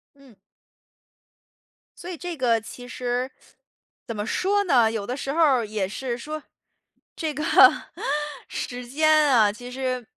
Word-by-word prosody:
嗯。 275 -6 -19 1.6
所 355 - -8
以 350 - -5
这 355 +1 -5
个 240 -4 +2
其 245 +2 -10
实 250 +1 -2 0.8
怎 230 - -4
么 210 0 -3
说 405 - +1
呢？ 240 - +4
有 220 -3 -3
的 250 - -2
时 275 - -3
候 330 - -2
儿 265 -7 +4
也 210 -3 -2
是 240 +3 -4
说， 305 +4 -6 0.7
这 315 -2 -3
个 300 +2 -4 1.0
时 245 -1 -5
间 310 +4 +2 0.2
啊， 220 -6 +5
其 245 +3 -10
实， 260 +1 -7
呃 255 -2 -2
250 Hz, 160 characters per minute, -24 LUFS, 235-300 Hz, 1.6 s, 啊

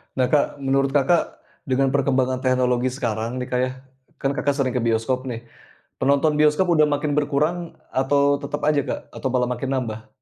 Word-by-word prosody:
Nah, 130 - +2
Kak, 145 -1 +1
menurut 135 +1 +1
Kakak 145 +5 +1 0.3
dengan 135 +1 +2
perkembangan 130 -2 +1
teknologi 130 -1 +1
sekarang 120 0 -3
nih, 125 - -4
Kak, 125 - +1
ya, 130 - -4 0.5
kan 135 - +1
Kakak 145 0 +1
sering 135 -3 0
ke - - +1
bioskop 115 +3 0
nih, 115 -2 -5 0.6
penonton 140 +2 +2
bioskop 150 +4 +3
udah 155 -2 +4
makin 145 0 -1
berkurang 150 +4 0 0.2
atau 140 +1 +2
tetep 145 +1 -5
aja, 150 -2 +3
Kak, - - -3
atau - - -4
malah 125 -1 +1
makin 125 +2 -3
nambah? 110 -4 -4
135 Hz, 175 wpm, -22 LUFS, 125-145 Hz, 0.6 s, udah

